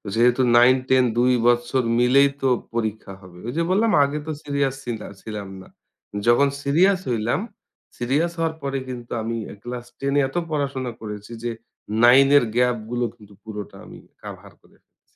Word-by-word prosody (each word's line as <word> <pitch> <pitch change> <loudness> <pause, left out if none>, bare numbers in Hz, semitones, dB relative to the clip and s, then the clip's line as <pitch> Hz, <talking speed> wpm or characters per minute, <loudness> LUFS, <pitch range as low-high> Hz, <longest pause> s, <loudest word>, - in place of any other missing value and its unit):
যেহেতু 120 +2 +3 0.2
9-10 130 +1 +4
২ 125 +1 +4
বৎসর 120 +2 +2 0.2
মিলেই 135 +3 +5
তো 135 - +2 0.3
পরীক্ষা 110 -3 -3
হবে। 90 -2 -14
ঐ - - -2
যে 170 - +2
বললাম 220 +4 +3
আগে 140 +2 -1
তো - - -2
সিরিয়াস 140 -2 -1
ছিলা 115 -3 -5
ছিলাম 105 -3 -7
না। - - -14 0.6
যখন 120 +4 +5 0.2
সিরিয়াস 185 +7 +3
হইলাম, 115 -1 0 0.6
সিরিয়াস 145 +8 0
হওয়ার 165 -1 0
পরে 135 0 -2
কিন্তু 120 -2 -8
আমি 115 +1 -3 0.3
ক্লাস 120 0 -6
10 140 0 -1
এ - - +4
এত - - -17 0.2
পড়াশোনা 140 -4 -2
করেছি 105 0 -8
যে 120 - -1 0.5
9 130 +3 +7
এর 140 - +4
গ্যাপ 125 0 +3
গুলো 120 0 0
কিন্তু 105 -3 -17
পুরোটা 105 -2 -8
আমি - - -12 0.2
কাভার - - -10
করে - - -25
ফেলছি। - - -45
125 Hz, 165 wpm, -22 LUFS, 115-140 Hz, 0.6 s, 9